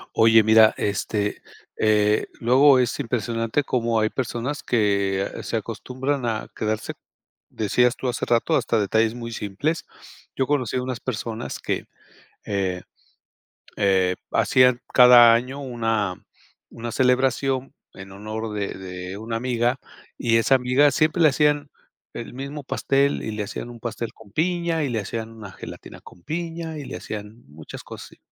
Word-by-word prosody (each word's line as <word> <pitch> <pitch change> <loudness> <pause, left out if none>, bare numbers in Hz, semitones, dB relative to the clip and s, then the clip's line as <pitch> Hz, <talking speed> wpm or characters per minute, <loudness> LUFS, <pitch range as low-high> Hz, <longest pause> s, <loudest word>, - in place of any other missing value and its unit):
Oye, 115 -1 +6
mira, 110 0 +6
este, 105 0 -2 0.4
eh, 105 0 +2
luego 130 +3 +5
es 125 +3 0
impresionante 115 +1 -1
cómo 120 -4 0
hay 110 0 +2
personas 130 +3 -3
que, 100 -4 +1
ah, - - -7
se - - -2
acostumbran 130 +1 -3
a 110 -2 -2
quedarse. 110 0 -2 0.6
Decías 125 +4 +1
tú, 130 - -4
hace 120 - -2
rato, 115 -1 +2
hasta 115 - +1
detalles 110 +2 +2
muy 115 -1 -6
simples. 115 +11 -2 0.5
Yo 130 - 0
conocí 130 -4 0
a 125 - -1
unas 125 -2 -4
personas 115 -2 -5
que, - - -3 0.6
eh, 95 -3 -2 1.0
eh, 95 -3 +2 0.2
hacían 125 -1 +4
cada 120 -2 +9
año 125 +4 -1
una 115 -7 -1 0.6
una 115 0 -6
celebración 130 +2 +1 0.2
en 95 0 -11
honor 110 +2 -5
de 100 -1 -2
de 90 0 -7
una 115 +1 -4
amiga, 120 +1 0 0.4
y 115 -2 +2
esa 125 +4 +4
amiga 130 +3 +3
siempre 155 +5 +1
le 155 - +7
hacían 145 +1 +1 0.4
el - - -7
mismo 140 +2 -6
pastel 140 +2 +1
y 110 - -3
le 105 -1 -3
hacían 110 +3 -6
un 120 - -11
pastel 115 -1 -4
con 105 -3 -17
piña 170 +1 0
y 135 - -1
le 115 - -1
hacían 115 +2 -5
una 105 -4 -10
gelatina - - -10
con 85 - -16
piña 165 - -4
y 145 - -7
le - - -7
hacían 105 +2 -8
muchas 75 +1 -11
cosas - - -9
así. - - -19
115 Hz, 155 wpm, -23 LUFS, 105-130 Hz, 1.0 s, cada